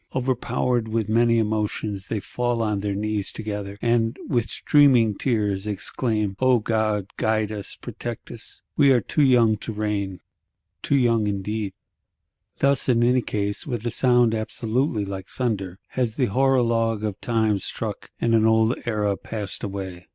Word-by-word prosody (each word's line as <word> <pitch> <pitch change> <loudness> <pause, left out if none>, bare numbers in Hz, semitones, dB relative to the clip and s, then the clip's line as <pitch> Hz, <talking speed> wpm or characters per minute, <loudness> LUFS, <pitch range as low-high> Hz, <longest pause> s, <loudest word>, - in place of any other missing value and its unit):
Over 130 0 +1
powered 120 -1 -1
with 110 -1 -1
many 115 +1 +3
emotions, 105 -2 -1
they - - -2
two - - -4
fall 120 -1 -1
on 105 -2 0
their 100 0 -2
knees 105 0 -1
together, 105 -2 -5
and, 115 -1 +1
with 120 -4 0
streaming 125 -8 +4
tears, 105 -5 -1
exclaim, 105 0 -1
'O 130 -1 +4
God, 110 -3 0
guide 110 -1 +1
us, 105 -2 -4
protect 120 -2 -7
us; 115 -2 -11
we 140 -2 +5
are 125 - +5
too 135 +7 -1
young 120 -5 +5
to 110 - -6
reign!'—Too 105 +5 -4
young 115 -4 +2
indeed. 100 0 -2 0.8
Thus, 140 -1 +2
in 120 -1 +4
any 125 +1 +3
case, 100 0 -3
"with 120 -4 -3
a 120 - 0
sound 120 -2 +3
absolutely 110 +1 -1
like 95 -1 -6
thunder," 100 -8 -3
has 120 -4 -1
the 125 -5 +1
Horologe 115 -3 +2
of 105 -3 -3
Time 110 -3 +1
struck, - - -4
and 115 - +1
an 110 -1 +4
old 110 +1 +4
Era 105 -3 +1
passed 105 -1 -5
away. 95 -3 -6
110 Hz, 160 wpm, -24 LUFS, 105-120 Hz, 0.8 s, we